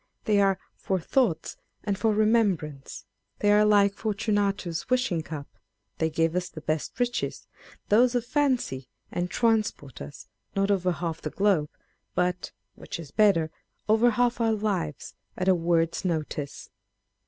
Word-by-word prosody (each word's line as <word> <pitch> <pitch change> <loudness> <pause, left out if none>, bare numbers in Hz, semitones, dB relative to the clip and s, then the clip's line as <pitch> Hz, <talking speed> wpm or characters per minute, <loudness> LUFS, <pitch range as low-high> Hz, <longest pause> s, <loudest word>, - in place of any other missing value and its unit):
They 205 -2 +4
are 195 -1 +3
" - - -47
for 190 -1 0
thoughts 190 -1 0 0.3
and 205 -2 0
for 215 +3 +1
remem 215 -3 +4
brance 140 -7 -9 0.2
!" 100 0 -52
They 205 - +4
are 210 0 +6
like 205 -1 +4
Forturiatus's 205 -5 -1
Wishing 250 -10 +1
Capâ€" 155 -2 -6 0.5
they 160 - +2
give 165 +1 0
us 180 0 -1
the - - -9
best 155 - -3
riches 245 0 -1
â€" - - -23
those 240 +4 +4
of 245 -1 0
Fancy; 245 - 0 0.2
and 175 +1 -2
transport 215 - 0
us, 70 +1 -9 0.3
not 195 +1 +2
over 185 -2 +2
half 170 -1 -3
the 155 - -3
globe, 190 -5 +2 0.5
but 180 0 0 0.2
(which - - -7
is 155 -4 -9
better) 180 -7 +3 0.4
over 220 +3 +5
half 240 +1 +1
our 225 -1 +3
lives, 190 -9 -2 0.2
at 185 - -2
a 190 - +7
word's 165 -1 +1
notice 155 -5 -3
195 Hz, 160 wpm, -27 LUFS, 160-215 Hz, 0.5 s, a